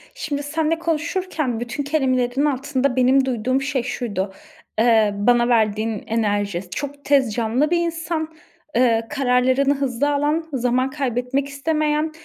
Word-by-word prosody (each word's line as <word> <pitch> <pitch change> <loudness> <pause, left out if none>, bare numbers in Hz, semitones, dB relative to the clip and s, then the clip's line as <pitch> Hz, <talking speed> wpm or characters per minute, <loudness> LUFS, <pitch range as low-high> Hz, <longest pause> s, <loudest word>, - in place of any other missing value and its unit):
Şimdi, 290 -1 -3
seninle 315 +2 -1
konuşurken, 330 -5 -2
bütün 240 +4 -4
kelimelerin 265 -2 +1
altında 275 -2 0
benim 260 +1 +4
duyduğum 255 +1 0
şey 270 -2 -1
şuydu, 205 -6 -3 0.5
eee, 220 -3 +4
bana 240 +3 +3
verdiğin 220 -2 +1
enerji; 205 -5 -1
çok 285 +8 -6
tez 270 -6 +3
canlı 240 +7 0
bir 350 - +3
insan. 330 -1 -2 0.4
Eee, 230 -2 +3
kararlarını 260 0 +2
hızlı 275 0 0
alan, 295 +3 0
zaman 255 +1 +1
kaybetmek 265 0 -1
istemeyen 305 +2 0
265 Hz, 125 wpm, -21 LUFS, 240-290 Hz, 0.5 s, benim